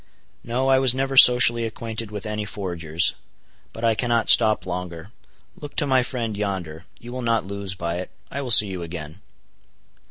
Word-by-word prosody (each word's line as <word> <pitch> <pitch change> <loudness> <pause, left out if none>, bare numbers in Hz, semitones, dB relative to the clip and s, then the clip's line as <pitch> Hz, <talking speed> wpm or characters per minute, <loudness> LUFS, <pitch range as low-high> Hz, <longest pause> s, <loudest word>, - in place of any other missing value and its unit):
"No, 125 +3 -2
I 135 0 +3
was 130 -2 +2
never 135 0 -3
socially 125 -2 +6
acquainted 115 -1 -6
with 105 0 -8
any 105 0 -4
forgers. 85 -5 -2 0.6
But 115 - -11
I 115 - +3
cannot 115 0 -1
stop 110 -2 +4
longer. 90 -2 -7 0.4
Look 145 -1 -11
to - - +1
my 130 -2 +2
friend 120 -4 -4
yonder. 95 -5 -5
You 120 - -11
will 130 +1 -6
not 115 -4 -1
lose 100 -1 -5
by 85 -1 -4
it. 90 - -7 0.2
I 140 - -5
will 130 - -6
see 110 -2 +9
you 95 -2 -6
again." 80 +1 -9
110 Hz, 180 wpm, -22 LUFS, 90-120 Hz, 0.6 s, see